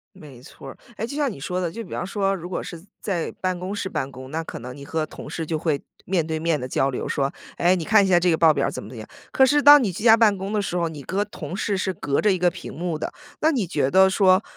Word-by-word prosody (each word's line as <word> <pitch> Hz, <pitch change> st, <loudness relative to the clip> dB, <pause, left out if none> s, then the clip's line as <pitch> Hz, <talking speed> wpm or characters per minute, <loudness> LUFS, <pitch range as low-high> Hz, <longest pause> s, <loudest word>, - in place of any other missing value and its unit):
没 145 Hz, -9 st, -13 dB
错 135 Hz, 0 st, -12 dB
儿。 -, -, -11 dB, 0.2 s
哎， 220 Hz, -, -3 dB
就 280 Hz, -, -7 dB
像 290 Hz, -4 st, 0 dB
你 -, -, -10 dB
说 180 Hz, +6 st, -3 dB
的， 175 Hz, -3 st, -2 dB
就 230 Hz, +6 st, -6 dB
比 190 Hz, -, -14 dB
方 175 Hz, -, -3 dB
说 195 Hz, 0 st, 0 dB
如 175 Hz, 0 st, -8 dB
果 -, -, -3 dB
是 170 Hz, -1 st, -9 dB, 0.2 s
在 180 Hz, -5 st, -2 dB
办 185 Hz, -1 st, -1 dB
公 185 Hz, +3 st, -4 dB
室 200 Hz, -2 st, -3 dB
办 135 Hz, -, -3 dB
公， 130 Hz, +1 st, -10 dB
那 165 Hz, +1 st, -2 dB
可 -, -, -8 dB
能 125 Hz, +2 st, -8 dB
你 140 Hz, -, -10 dB
和 160 Hz, +1 st, -2 dB
同 -, -, -10 dB
事 165 Hz, -, -4 dB
就 160 Hz, 0 st, -2 dB
会 155 Hz, -3 st, -1 dB, 0.2 s
面 175 Hz, -4 st, 0 dB
对 160 Hz, 0 st, -3 dB
面 165 Hz, -1 st, 0 dB
地 125 Hz, -, -5 dB
交 135 Hz, +1 st, +1 dB
流， 130 Hz, -, -4 dB
说：” 140 Hz, -1 st, -1 dB, 0.3 s
哎， 175 Hz, +2 st, +3 dB
你 175 Hz, -, -3 dB
看 215 Hz, -2 st, +5 dB
一 -, -, +1 dB
下 180 Hz, -2 st, +5 dB
这 180 Hz, +1 st, +2 dB
个 160 Hz, -, +2 dB
报 160 Hz, -2 st, +5 dB
表 140 Hz, -, 0 dB
儿 -, -, -3 dB
怎 -, -, -6 dB
么 -, -, -10 dB
怎 125 Hz, -, -11 dB
么 115 Hz, -, -8 dB
样。 110 Hz, -, -9 dB, 0.2 s
“可 265 Hz, -, +5 dB
是 290 Hz, +2 st, +3 dB
当 290 Hz, -1 st, +9 dB
你 200 Hz, -, 0 dB
居 205 Hz, -, -7 dB
家 225 Hz, -2 st, +8 dB
办 215 Hz, -3 st, +4 dB
公 195 Hz, +2 st, -5 dB
的 210 Hz, -, +1 dB
时 180 Hz, -2 st, -3 dB
候， 170 Hz, -1 st, 0 dB
你 155 Hz, -3 st, -8 dB
和 195 Hz, +7 st, -1 dB
同 180 Hz, -4 st, -7 dB
事 205 Hz, -1 st, -1 dB
是 185 Hz, 0 st, -1 dB
隔 140 Hz, -4 st, -1 dB
着 210 Hz, -, +3 dB
一 185 Hz, -, +1 dB
个 180 Hz, 0 st, +3 dB
屏 -, -, -9 dB
幕 170 Hz, -1 st, -3 dB
的。 -, -, -4 dB, 0.3 s
那 315 Hz, -, +4 dB
你 235 Hz, -, -1 dB
觉 145 Hz, -6 st, 0 dB
得 190 Hz, 0 st, +6 dB
说 190 Hz, 0 st, +4 dB
180 Hz, 335 characters per minute, -23 LUFS, 155-200 Hz, 0.3 s, 当